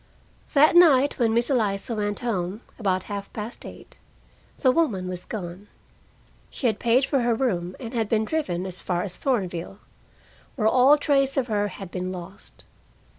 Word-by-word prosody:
That 305 +3 +5
night 290 -6 +5
when 230 -2 +3
Miss 235 +4 +1
Eliza 210 -3 0
went 205 0 -2
home, 200 -3 -2 0.2
about 185 -4 0
half 200 -1 -6
past 220 +2 -6
eight, - - -13 0.6
the 260 - +3
woman 230 - 0
was 180 -1 -5
gone. 185 -1 -7 0.8
She - - -7
had 220 -4 +2
paid 245 +3 +3
for 275 - +1
her 240 -1 +1
room 185 -8 -1
and 235 -2 -7
had 225 -3 -1
been 220 -1 +1
driven 190 - -2
as 185 -1 -6
far 175 -1 -1
as 190 -3 -5
Thornville, 190 -8 -2 0.8
where 215 -5 +1
all 260 +6 +6
trace 275 -2 +1
of 265 - +2
her 205 -1 +1
had 195 -2 -9
been 185 0 -3
lost. 185 +1 -10
215 Hz, 170 wpm, -25 LUFS, 185-255 Hz, 0.8 s, all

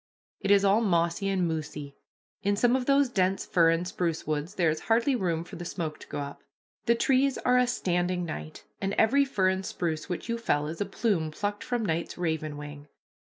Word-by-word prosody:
It 195 - -3
is 200 0 +5
all 200 +3 +4
mossy 170 -1 +1
and 185 -3 +1
moosey. 150 -3 -5 0.5
In 200 0 +1
some 245 +4 +3
of 255 -1 -1
those 280 0 +4
dense 190 -5 0
fir 165 -2 +4
and 165 +2 +1
spruce 170 -3 -2
woods 155 +5 -2
there 170 -4 +3
is 155 - -3
hardly 235 +4 +3
room 170 -7 -1
for 175 - -10
the 175 - -6
smoke 165 -3 -4
to - - -12
go - - -5
up. 140 0 -7 0.5
The 235 - +5
trees 265 +2 +2
are 250 0 +3
a 250 - +3
standing 180 -5 0
night, 75 - -7 0.2
and 195 0 -1
every 275 +6 +4
fir 195 -8 +2
and 190 0 -1
spruce 165 -2 -3
which 175 - -4
you 235 0 -2
fell 150 -10 +1
is 160 +5 -5
a 205 - 0
plume 200 -9 0
plucked 205 +6 -3
from 245 -3 -1
night's 165 -2 -2
raven 160 -3 -2
wing. 145 0 -9
180 Hz, 210 wpm, -28 LUFS, 160-220 Hz, 0.5 s, is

